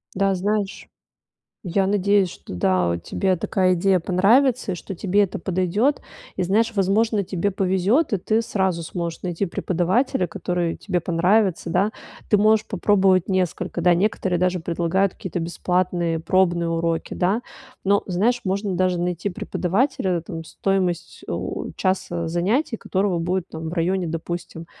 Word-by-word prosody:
Да, 195 0 +2
знаешь, 200 +1 -2 0.8
я 190 +2 +1
надеюсь, 200 -1 +2
что, - - -10
да, 90 0 +2
у 85 - 0
тебе 185 - -1
такая 185 +1 +1
идея 185 +2 +3
понравится 220 +7 +3
и - - -2
что 195 - -7
тебе 195 +3 +2
это 190 - -5
подойдет. 190 +9 +1 0.4
И - - 0
знаешь, 220 +5 +2
возможно, 205 +2 +2
тебе 185 +2 -1
повезет, 195 - +1
и - - +3
ты 215 +4 +1
сразу 190 -6 -1
сможешь 170 0 -5
найти 180 +1 -2
преподавателя, 185 +4 0
который 180 -4 -2
тебе 180 -3 -2
понравится, 180 +2 +1
да. 195 +5 +2 0.4
Ты 210 - +5
можешь 215 +1 +4
попробовать 190 -3 +2
несколько, 185 -1 -1
да, 180 +1 +5
некоторые 185 -1 0
даже 180 0 +1
предлагают 175 +3 0
какие-то 180 -1 -5
бесплатные 170 0 -1
пробные 175 0 +2
уроки, 165 0 -1
да. 195 +6 +1 0.4
Но 200 +1 +3
знаешь, 215 +7 +1
можно 195 0 -1
даже 180 0 +1
найти 175 +2 -1
преподавателя, 185 - -1
там 165 0 -7
стоимость, 185 -1 -2
у, - - -4
часа 175 -3 -1
занятий 210 - 0
у - - -22
которого 190 -2 0
будет 180 +2 -1
там 160 0 -6
в - - -6
районе, 180 +1 0
допустим, 165 0 -5
185 Hz, 150 wpm, -22 LUFS, 175-200 Hz, 0.8 s, Ты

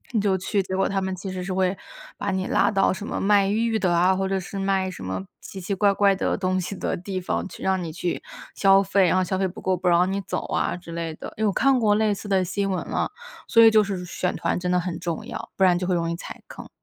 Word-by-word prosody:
你 215 - +3
就 195 -2 +2
去， 195 +2 0
结 190 0 -4
果 195 0 +2
他 195 -1 -1
们 190 0 -2
其 190 +1 -6
实 185 -1 -4
是 190 - -4
会 185 0 +1 0.4
把 200 - -2
你 190 -1 -1
拉 - - +2
到 195 -2 +2
什 205 +3 -7
么 - - -3
卖 200 -1 +4
玉 225 +2 +1
的 185 -3 +1
啊， 180 +2 +4
或 190 0 -1
者 195 0 0
是 195 +2 -6
卖 195 -1 0
什 185 - -10
么 95 +1 -4 0.2
奇 195 - -9
奇 200 +2 -3
怪 200 +1 +3
怪 200 0 +3
的 - - -1
东 185 -1 0
西 195 - -5
的 - - -2
地 185 +1 -4
方， 180 - -2
去 - - -10
让 190 -1 +1
你 165 - -5
去 175 +2 -3 0.3
消 195 0 +5
费， 195 0 +3
然 180 - +2
后 185 - +3
消 190 +1 -2
费 190 - +2
不 175 - -9
够， 185 - 0
不 180 0 -3
让 180 +2 +4
你 200 - -1
走 - - -4
啊 - - 0
之 175 -1 -11
类 165 -1 -4
的。 - - -9
因 220 - -2
为 215 - +4
我 - - +2
看 270 +3 +3
过 210 -3 +3
类 215 -1 +2
似 205 +1 -7
的 190 -2 +2
新 195 +2 -1
闻 185 -2 -2
了， - - -1 0.4
所 230 - +6
以 225 - +8
就 215 -1 +5
是 190 -3 -4
选 180 +1 -2
团 - - -1
真 180 0 -2
的 180 - +3
很 175 -1 -4
重 170 -2 -4
要， - - -7
不 195 - +1
然 180 -2 +4
就 180 - -3
会 180 - +1
容 170 -1 -1
易 - - -2
踩 170 - -9
坑。 - - -10
190 Hz, 310 characters per minute, -24 LUFS, 180-200 Hz, 0.4 s, 以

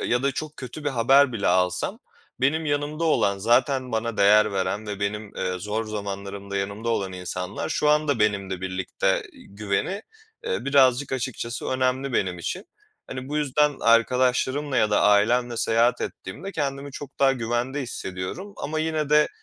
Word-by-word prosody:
eee, - - -2
ya 125 +1 +1
da 140 0 +1
çok 155 +2 -5
kötü 135 +4 -8
bir 145 - +1
haber 135 +2 +4
bile 110 -4 -2
alsam, 90 0 +1 0.4
benim 155 +5 +1
yanımda 145 +2 -1
olan 100 -11 +2
zaten 125 +4 +2
bana 115 0 -1
değer 105 +1 +5
veren 95 +2 -2
ve 105 -1 -5
benim, 105 +1 -3
eee, 90 0 -2
zor 105 +4 -2
zamanlarımda 100 -1 -5
yanımda 100 +3 -3
olan 100 -5 -1
insanlar 90 0 -4
şu 150 -1 +1
anda 150 -3 +2
benimle 100 -3 0
birlikte, 95 0 -2
ııı, - - -2 0.3
güveni, 105 - -2 0.4
eee, 470 +1 -2
birazcık 135 -1 +3
açıkçası 120 -2 -3
önemli 130 +1 0
benim 90 -5 0
için. 180 - -4 0.4
Hani, 130 0 -6
bu 150 - -2
yüzden 150 0 +2
arkadaşlarımla 130 +4 +2
ya 110 -3 +3
da 105 - +3
ailemle 120 +4 +3
seyahat 115 +1 +2
ettiğimde 195 - -6
kendimi 140 -2 -3
çok 145 +1 -9
daha 135 -1 +5
güvende 120 +3 -2
hissediyorum 120 - -6
ama 155 +2 -3
yine 155 -2 -1
de 150 0 +5
120 Hz, 165 wpm, -25 LUFS, 100-140 Hz, 0.4 s, değer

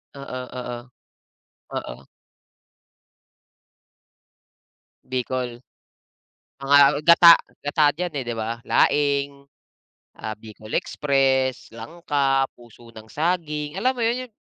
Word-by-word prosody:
Oo, 140 -2 -7 0.2
oo. 125 -1 -5 1.0
Oo. 65 +2 -7 3.0
Bicol. 125 -1 -4 1.0
Ah, 140 0 +5
gata, 170 +1 +8 0.2
gata 145 0 +2
diyan, 175 +2 -4
eh, 135 - -3
'di 120 - -3
ba, 115 +1 -4
laing, 140 -1 +1 0.8
ah, 110 - -4
bicol 110 0 -13
express, 135 -3 0
langka, 135 +1 -1
puso 120 0 -18
ng 110 0 -13
saging, 150 -2 -2
alam 215 +8 +1
mo 250 -2 -4
yun, 250 +2 -1
yung 240 - -31
140 Hz, 95 wpm, -23 LUFS, 120-150 Hz, 3.0 s, gata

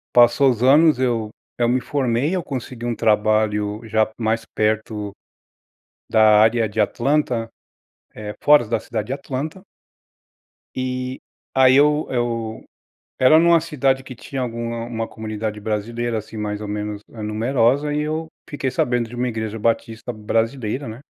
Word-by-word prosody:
passou 120 +3 +6
os 120 -2 -1
anos, 150 +3 +6
eu 120 -4 0 0.3
eu 120 - +2
me 125 +1 +2
formei, 135 +3 0
eu 185 - 0
consegui 125 -3 -6
um 120 -1 -1
trabalho 105 -1 +1
já 110 0 +1
mais 115 0 -1
perto 110 -1 -2 1.0
da 110 -1 +6
área 110 +1 +3
de 105 - -5
Atlanta, 125 -3 +1 0.7
eh, 105 -1 -6
fora 150 -4 +6
da 115 0 0
cidade 105 - -4
de 130 - -2
Atlanta. 140 +5 -5 1.2
E, 130 0 -3 0.3
aí 130 -1 +6
eu 150 +1 +4
eu 115 -3 -2 0.5
era 130 +5 +6
numa 170 0 +5
cidade 135 -4 0
que 130 - -10
tinha 135 +3 -6
alguma 115 -1 -3
uma 115 -1 -3
comunidade 110 -1 -5
brasileira, 115 +3 -2
assim, 110 +1 -6
mais 105 0 -3
ou 105 - -5
menos 105 0 -4
numerosa, 120 +6 0
eh, - - -1
e - - 0
eu 155 +2 -2 0.2
fiquei 135 -2 -2
sabendo 120 -1 0
de - - -10
uma 125 +1 -1
igreja 110 -1 -4
batista 115 +1 -1
brasileira, 115 +4 -2
né. 110 +3 -8
115 Hz, 150 wpm, -21 LUFS, 110-130 Hz, 1.2 s, passou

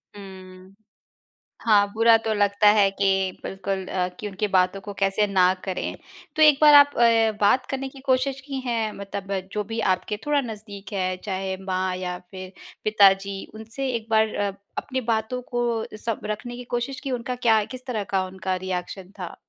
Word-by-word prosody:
हम्म, 190 -1 -12 0.9
हाँ, 205 -3 +4
बुरा 225 +1 +5
तो 225 0 -2
लगता 205 0 +3
है 200 -2 +5
कि 195 -1 +1
बिल्कुल 190 0 -4
अ, 180 -1 -1
कि 210 - -4
उनकी 205 +1 -2
बातों 185 0 +2
को 205 +1 -7
कैसे 195 +1 +2
ना 185 -2 +4
करें? 185 -2 -3 0.4
तो 315 - 0
1 300 -2 +7
बार 300 -1 +8
आप 285 0 +7
ए, 230 -2 +4
बात 245 +5 +4
करने 270 0 -3
की 270 - -14
कोशिश 265 +1 +1
की 275 -2 -4
हैं 225 -3 -1
मतलब 200 0 -7 0.2
जो 210 - -1
भी 225 +2 -5
आपके 210 +3 -4
थोड़ा 295 -1 +2
नज़दीक 210 -5 -9
है, 185 -1 -1
चाहे 190 -1 -3
माँ 185 -1 -1
या 180 -1 -4
फिर 185 -1 -8 0.3
पिताजी 195 -2 +3
उनसे 225 +5 -5
1 225 -1 -5
बार 220 0 +2
अ, 205 -1 0 0.3
अपनी 260 -1 -3
बातों 220 +3 -2
को 240 -2 0
सब 225 0 -3
रखने 215 +3 -4
की 250 - -7
कोशिश 260 +3 -3
की? 275 - -5
उनका 250 0 -3
क्या 225 -3 +3
किस 255 +3 -10
तरह 230 -6 -2
का 190 -1 +2
उनका 185 0 -3
रिएक्शन 185 +1 -5
था? 180 -2 -6
210 Hz, 180 wpm, -24 LUFS, 190-235 Hz, 0.9 s, बार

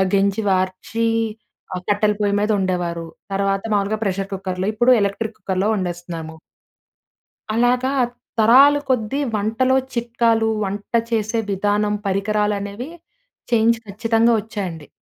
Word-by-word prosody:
గెంజి 200 +2 +1
వార్చి 185 +5 0 0.7
ఆహ్, 180 - -4
కట్టెల 210 +1 +2
పొయ్యి 205 -1 +2
మీద 210 - 0
వండేవారు. 175 -3 -1 0.3
తర్వాత 195 0 0
మామూలుగా 205 +1 +1
ప్రెషర్ 195 +1 -2
కుక్కర్‌లో 190 0 -3
ఇప్పుడు 240 +3 +4
ఎలక్ట్రిక్ 210 +2 -2
కుక్కర్‌లో 190 +1 -1
వండేస్తున్నాము. 175 -4 -5 1.2
అలాగా 245 +3 +2 0.5
తరాల 265 +6 +7
కొద్దీ 250 +1 0 0.2
వంటలో 235 +6 +1 0.2
చిట్కాలు 230 -1 +1
వంట 200 +3 -5 0.2
చేసే 225 0 0
విధానం 205 +2 +1
పరికరాలు 210 +2 +1
అనేవి 205 +8 -6 0.6
చేంజ్ 230 0 +4
ఖచ్చితంగా 225 +3 +2
వచ్చాయండి. 190 - -6
205 Hz, 110 wpm, -21 LUFS, 195-225 Hz, 1.2 s, తరాల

